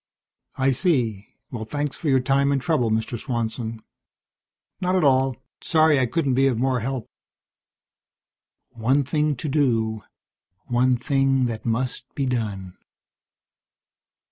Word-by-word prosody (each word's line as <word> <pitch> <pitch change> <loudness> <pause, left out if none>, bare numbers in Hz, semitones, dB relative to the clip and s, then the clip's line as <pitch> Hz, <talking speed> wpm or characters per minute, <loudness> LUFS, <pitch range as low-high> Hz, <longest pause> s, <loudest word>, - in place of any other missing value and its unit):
"I 135 0 +3
see. 120 - 0 0.2
Well, 115 -3 -5
thanks 145 +4 -3
for 160 - -3
your 135 -1 +4
time 140 +2 +2
and 140 - +2
trouble, 125 -4 +1
Mr. 110 +1 -1
Swanson." 115 -3 -4 1.0
"Not 185 0 0
at 185 - +2
all. 130 -2 +3 0.3
Sorry 155 -3 +4
I 130 - +2
couldn't 140 0 0
be 135 +2 +3
of 125 -4 +1
more 130 +1 +1
help." 125 0 -3 1.7
One 130 +5 +1
thing 150 +2 0
to 145 +5 -5
do. 115 -7 +1 0.6
One 125 0 +2
thing 135 0 +1
that 115 -1 -4
must 125 +3 -1
be 140 - -1
done. 105 -7 -3
130 Hz, 130 wpm, -23 LUFS, 115-140 Hz, 1.7 s, your